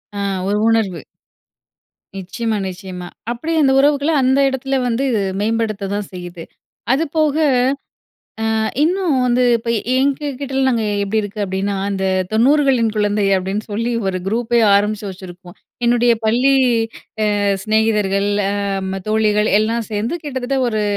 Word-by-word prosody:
அ - - -5 0.3
ஒரு 205 +1 +1
உணர்வு. 215 -7 +1 1.2
நிச்சயமா, 220 +4 -3
நிச்சயமா. 185 -1 -7 0.2
அப்படி 245 +8 -4
அந்த 270 - +4
உறவுகள 285 +2 +2
அந்த 265 +2 +3
எடத்துல 270 +1 -2
வந்து 245 +4 0 0.4
மேம்படுத்ததான் 210 -2 -2
செய்யுது. 175 -2 -8 0.5
அதுபோக 310 0 0 1.2
அ - - +1 0.2
இன்னும் 355 0 +1
வந்து 250 0 +2
இப்ப 230 +1 -6 0.3
எங்ககிட்டலாம் 275 -1 -1
நாங்க 230 -3 0 0.2
எப்படி 215 +2 0
இருக்கு 205 +1 -7
அப்படீன்னா, 195 +1 -2
அந்த 195 -1 -2 0.3
90களின் 255 -1 +3
குழந்தை 205 -1 +1
அப்படீன்னு 195 +3 -3
சொல்லி 230 +3 -1
ஒரு 185 -1 -1
குரூப்பே 235 +2 +1
ஆரம்பிச்சு 210 +1 +1
வச்சுருப்போம். 180 0 -11 0.3
என்னுடைய 240 0 +4
பள்ளி 245 +5 +3 0.8
அ - - -1 0.2
சிநேகிதர்கள் 210 -2 +1 0.2
அ - - -1 0.4
ம 195 0 -4
தோழிகள் 215 -1 +2
எல்லா 225 +2 0
சேந்து 220 +10 -2
கிட்டத்தட்ட 265 -1 -2
ஒரு 215 -2 -1
220 Hz, 125 wpm, -18 LUFS, 200-265 Hz, 1.2 s, அந்த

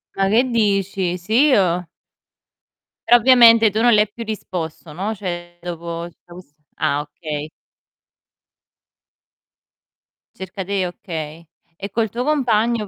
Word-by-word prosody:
Ma 195 0 +1
che 225 +5 +3
dici? 195 -5 0
Sì, 220 +11 +2
io? 180 - +2 1.2
Però 240 - +8
ovviamente 230 -2 +6
tu 215 +2 -2
non 240 -1 +5
le 210 - +5
hai 210 - -1
più 230 +2 -7
risposto, 175 -7 -6
no, 200 +6 -3
cioè 175 -3 -7
dopo 170 -1 -6
tutto 175 +1 -18
ques 180 -5 -14 0.2
ah, 145 +1 0
okay. 150 0 -7 2.9
Cerca 190 0 -7
te 195 -2 -1
okay. 165 -2 -7 0.3
E 200 - -6
col 220 0 0
tuo 240 +4 -3
compagno 235 -6 +1
195 Hz, 125 wpm, -20 LUFS, 175-225 Hz, 2.9 s, Però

